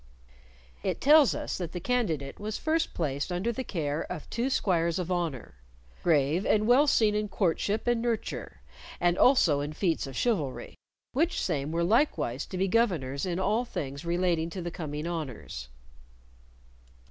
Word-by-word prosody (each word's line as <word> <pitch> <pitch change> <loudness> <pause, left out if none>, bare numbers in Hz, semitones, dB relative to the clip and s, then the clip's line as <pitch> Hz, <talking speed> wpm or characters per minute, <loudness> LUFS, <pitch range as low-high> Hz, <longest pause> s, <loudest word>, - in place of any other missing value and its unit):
It - - -2
tells 295 -1 +6
us - - -4
that 175 -3 -4
the 180 - -3
candidate 170 - -1
was 210 +1 -3
first 320 +1 0
placed 145 0 -2
under 185 +7 0
the 260 +3 -4
care 155 - -2
of 155 - -6
two 240 +3 0
squires 170 -9 +1
of 180 -1 -3
honor, 165 - -2 0.5
"grave 155 +2 +2
and 215 0 +2
well 255 +6 +5
seen 220 -6 +4
in 210 0 0
courtship 200 +3 0
and 240 -1 +2
nurture, 235 -2 -3 0.4
and 175 0 +3
also 185 - +4
in 145 +2 -3
feats 165 -3 0
of 135 - -8
chivalry," 165 - -1 0.4
which 325 +7 +1
same 150 -4 -1
were 170 +1 0
likewise 175 - +1
to 185 - -6
be 190 +1 +1
governors 175 - +1
in 175 -1 -1
all 210 +5 +1
things 140 - -5
relating 170 -1 0
to 185 +2 -6
the 175 - -4
coming 150 -2 -5
honors. 135 - -5
175 Hz, 160 wpm, -28 LUFS, 155-220 Hz, 0.5 s, tells